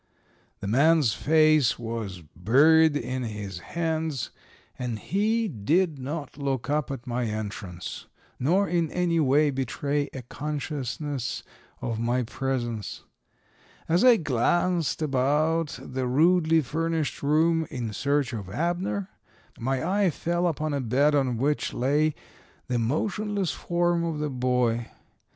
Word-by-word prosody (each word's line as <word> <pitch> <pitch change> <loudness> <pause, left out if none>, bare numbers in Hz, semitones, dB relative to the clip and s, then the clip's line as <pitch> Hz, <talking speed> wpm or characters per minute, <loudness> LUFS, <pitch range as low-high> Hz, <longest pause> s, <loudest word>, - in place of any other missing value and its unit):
The 100 - -4
man's 140 +1 +4
face 155 -1 +4
was 110 -6 -5
buried 145 - +5
in 130 0 -3
his 105 -5 -5
hands, 160 - -2 0.5
and 120 -3 -2
he 215 - 0
did 155 - +1
not 145 +1 -5
look 135 -1 -2
up 150 -1 0
at 135 -3 -6
my 125 -1 -1
entrance, 105 -5 -5 0.3
nor 180 +10 +2
in 170 -3 +1
any 175 -1 +1
way 145 +1 +3
betray 140 +2 -1
a 130 - -7
consciousness 145 -1 -4 0.4
of 115 -2 -2
my 120 +2 +1
presence. 120 -3 -3 0.8
As 170 +3 +3
I 250 -2 +7
glanced 165 - +1
about 150 +3 +1
the 130 -1 -4
rudely 160 +4 +4
furnished 160 +2 -2
room 160 +2 +2
in 115 -4 -4
search 140 +1 0
of 100 -5 -5
Abner, 175 - -1 0.5
my 135 +5 -1
eye 195 0 +3
fell 175 +2 -1
upon 155 -2 -1
a 140 - 0
bed 135 +5 +2
on 130 -4 +1
which 145 +5 0
lay 145 +4 +2 0.5
the 125 -2 -1
motionless 200 - -1
form 175 0 0
of 165 -2 -2
the 150 -1 -2
boy. 125 -2 0
145 Hz, 130 wpm, -26 LUFS, 125-165 Hz, 0.8 s, I